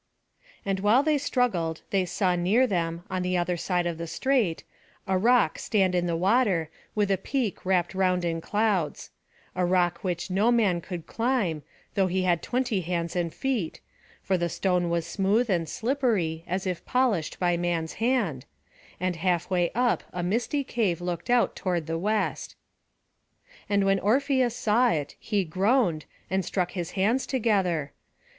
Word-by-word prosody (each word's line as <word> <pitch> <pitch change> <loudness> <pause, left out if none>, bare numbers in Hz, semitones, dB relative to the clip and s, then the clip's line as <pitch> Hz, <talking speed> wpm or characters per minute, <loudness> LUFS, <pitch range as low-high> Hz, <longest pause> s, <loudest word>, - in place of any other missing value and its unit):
And 195 -1 0
while 215 +7 +4
they 300 -1 +2
struggled 195 - 0
they 195 -2 +2
saw 180 0 0
near 195 +9 +3
them, 170 -5 -2
on 185 -1 -1
the 180 0 0
other 175 0 0
side 175 +1 -1
of 170 -1 -3
the 170 - -4
strait, 235 -5 0 0.4
a 190 - 0
rock 225 -3 +3
stand 190 -4 +1
in 175 -1 +1
the 170 - 0
water, 190 -4 +2 0.2
with 205 -2 +1
a 190 - +1
peak 240 -1 -2
wrapt 180 -2 +1
round 185 -2 +1
in 165 -1 -1
clouds; 205 -5 -1 0.4
a 180 - 0
rock 175 -1 +2
which 180 0 -3
no 205 +6 +3
man 205 -8 +2
could 175 -2 -7
climb, 225 - 0 0.3
though 195 -2 +2
he 185 +1 0
had 175 -2 +2
twenty 245 -6 -1
hands 170 0 -3
and 170 -2 -1
feet, 245 - -2 0.4
for 190 -2 +1
the 170 0 0
stone 180 -1 0
was 170 -1 0
smooth 205 +6 +1
and 165 -4 0
slippery, 220 - 0
as 185 +2 -2
if 180 -2 -3
polished 235 -11 0
by 175 -1 +2
man's 170 -2 -1
hand; 220 - 0 0.5
and 180 -1 -1
half 175 +1 0
way 175 -2 +2
up 245 0 +2
a 180 - -4
misty 235 +9 0
cave 210 -10 0
looked 175 +3 -4
out 245 -1 +3
toward 175 -4 -1
the 165 +1 -2
west. 210 +3 -1 1.1
And 200 -1 +2
when 195 0 +3
Orpheus 255 +2 +2
saw 240 +1 +3
it, 150 -8 -2
he 205 -3 0
groaned, 185 - +1 0.2
and 190 +1 0
struck 180 0 -1
his 175 -3 -5
hands 225 +8 +1
together. 195 - 0
185 Hz, 165 wpm, -26 LUFS, 175-225 Hz, 1.1 s, while